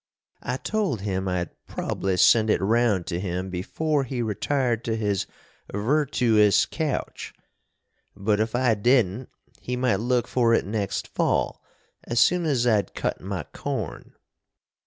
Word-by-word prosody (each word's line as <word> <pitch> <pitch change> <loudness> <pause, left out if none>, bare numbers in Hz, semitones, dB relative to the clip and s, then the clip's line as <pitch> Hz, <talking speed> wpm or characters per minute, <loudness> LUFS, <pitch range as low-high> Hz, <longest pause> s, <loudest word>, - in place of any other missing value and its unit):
I 125 +1 -3
told 195 - -1
him 95 -1 -2
I'd 90 -2 -2 0.2
probly 95 -1 -2
send 110 +3 +5
it - - +3
round 110 -3 +2
to 85 -1 -3
him 90 0 -3
before 145 - -1
he 125 -2 -3
retired 120 +2 -1
to 115 - 0
his 105 -3 -1 0.4
virtoous 115 -3 +3
couch, 155 -4 -4 0.8
but 105 +1 0
if 110 +1 -1
I 125 -2 +3
didn't 120 +1 +2 0.3
he 125 +4 -4
might 125 -6 +1
look 120 +1 0
for 115 -2 +3
it - - 0
next 100 -1 -2
fall - - 0 0.4
as 120 0 -1
soon 175 +7 +4
as 130 -5 +1
I'd 110 -4 +1
cut - - -2
my 95 -3 -4
corn. - - -5
115 Hz, 140 wpm, -25 LUFS, 100-125 Hz, 0.8 s, send